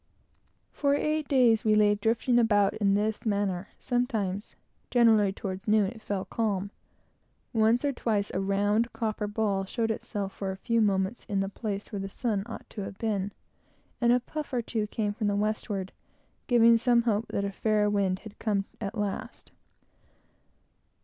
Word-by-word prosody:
For 280 Hz, -1 st, +1 dB
eight 305 Hz, 0 st, 0 dB
days 245 Hz, -6 st, +4 dB
we 215 Hz, -1 st, +4 dB
lay 210 Hz, -1 st, +5 dB
drifting 225 Hz, +4 st, +2 dB
about 205 Hz, -4 st, +3 dB
in 200 Hz, -2 st, +2 dB
this 210 Hz, +1 st, -1 dB
manner. 200 Hz, -3 st, -1 dB
Sometimes, 220 Hz, -6 st, -2 dB, 0.3 s
generally 220 Hz, -5 st, +4 dB
towards 190 Hz, 0 st, -6 dB
noon, 215 Hz, -1 st, +4 dB
it 230 Hz, -2 st, -12 dB
fell 200 Hz, -3 st, -3 dB
calm; 200 Hz, -3 st, -1 dB, 0.8 s
once 225 Hz, +4 st, +3 dB
or 285 Hz, -, +1 dB
twice 210 Hz, -5 st, -1 dB
a 185 Hz, -, 0 dB
round 205 Hz, +4 st, +1 dB
copper 215 Hz, -2 st, -2 dB
ball 205 Hz, -2 st, 0 dB
showed 225 Hz, +3 st, -1 dB
itself 200 Hz, -2 st, -4 dB
for 195 Hz, -, -4 dB
a 190 Hz, -, -4 dB
few 230 Hz, +3 st, +1 dB
moments 195 Hz, +1 st, +1 dB
in 200 Hz, -1 st, -1 dB
the 195 Hz, 0 st, -1 dB
place 205 Hz, 0 st, -5 dB
where 205 Hz, -, -3 dB
the 195 Hz, 0 st, -4 dB
sun 210 Hz, -1 st, -1 dB
ought 230 Hz, -, -8 dB
to 210 Hz, -, -6 dB
have 195 Hz, 0 st, -6 dB
been; 205 Hz, -3 st, -1 dB, 0.7 s
and 240 Hz, 0 st, +4 dB
a 250 Hz, -, +5 dB
puff 300 Hz, +4 st, -6 dB
or 240 Hz, -2 st, 0 dB
two 220 Hz, -2 st, -2 dB
came 210 Hz, -1 st, -2 dB
from 210 Hz, 0 st, -2 dB
the 205 Hz, -, +1 dB
westward, 205 Hz, -2 st, -2 dB, 0.6 s
giving 235 Hz, -2 st, +6 dB
some 235 Hz, 0 st, +3 dB
hope 225 Hz, -1 st, 0 dB
that 200 Hz, -, -2 dB
a 200 Hz, -, -2 dB
fair 210 Hz, +1 st, +1 dB
wind 200 Hz, -3 st, +1 dB
had 215 Hz, 0 st, -11 dB
come 200 Hz, -3 st, 0 dB
at 220 Hz, +1 st, -4 dB
last. 205 Hz, -1 st, -4 dB
210 Hz, 170 wpm, -28 LUFS, 200-230 Hz, 0.8 s, giving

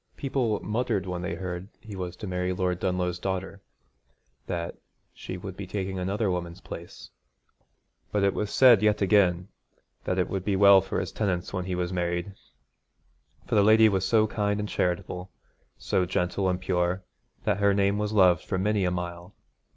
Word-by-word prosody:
People 130 Hz, -6 st, 0 dB
muttered 110 Hz, -3 st, -1 dB
when 90 Hz, -1 st, -4 dB
they 85 Hz, -1 st, -3 dB
heard 90 Hz, +1 st, -5 dB
he 105 Hz, -3 st, -10 dB
was 90 Hz, -2 st, -5 dB
to 100 Hz, -, -8 dB
marry 90 Hz, -1 st, -1 dB
Lord 90 Hz, -1 st, -1 dB
Dunlough's 90 Hz, -1 st, -1 dB
daughter, 95 Hz, +1 st, -4 dB, 0.9 s
that 85 Hz, -1 st, -3 dB, 0.4 s
she 95 Hz, -, -7 dB
would 95 Hz, 0 st, -7 dB
be 100 Hz, -1 st, -7 dB
taking 95 Hz, -1 st, -3 dB
another 100 Hz, +2 st, 0 dB
woman's 85 Hz, 0 st, -4 dB
place; 85 Hz, -2 st, -10 dB, 1.0 s
but 105 Hz, -1 st, +1 dB
it 100 Hz, -, +3 dB
was 105 Hz, -, -2 dB
said 120 Hz, -4 st, +6 dB
yet 105 Hz, -1 st, +2 dB
again 90 Hz, -2 st, +3 dB, 0.6 s
that 90 Hz, -, -1 dB
it 90 Hz, -, +1 dB
would 95 Hz, -2 st, -3 dB
be 100 Hz, -1 st, 0 dB
well 100 Hz, 0 st, +7 dB
for 95 Hz, -, -3 dB
his -, -, -4 dB
tenants 95 Hz, -5 st, -2 dB
when 90 Hz, -2 st, -2 dB
he 95 Hz, -1 st, -2 dB
was 90 Hz, 0 st, -2 dB
married, 85 Hz, +2 st, -2 dB, 1.1 s
for 120 Hz, -, -5 dB
the 105 Hz, -, +5 dB
lady 110 Hz, +2 st, +6 dB
was 95 Hz, -2 st, 0 dB
so 110 Hz, 0 st, +4 dB
kind 105 Hz, -1 st, -1 dB
and 105 Hz, 0 st, -3 dB
charitable, 90 Hz, +1 st, -2 dB, 0.5 s
so 95 Hz, -, 0 dB
gentle 90 Hz, +2 st, 0 dB
and 90 Hz, 0 st, -1 dB
pure, 90 Hz, 0 st, 0 dB, 0.4 s
that 100 Hz, -, 0 dB
her 100 Hz, 0 st, +4 dB
name 100 Hz, +1 st, +2 dB
was 105 Hz, 0 st, -1 dB
loved 90 Hz, -5 st, +4 dB
for 95 Hz, -, -2 dB
many 105 Hz, +1 st, +1 dB
a -, -, +2 dB
mile. 90 Hz, +1 st, -5 dB
95 Hz, 180 wpm, -27 LUFS, 90-105 Hz, 1.1 s, well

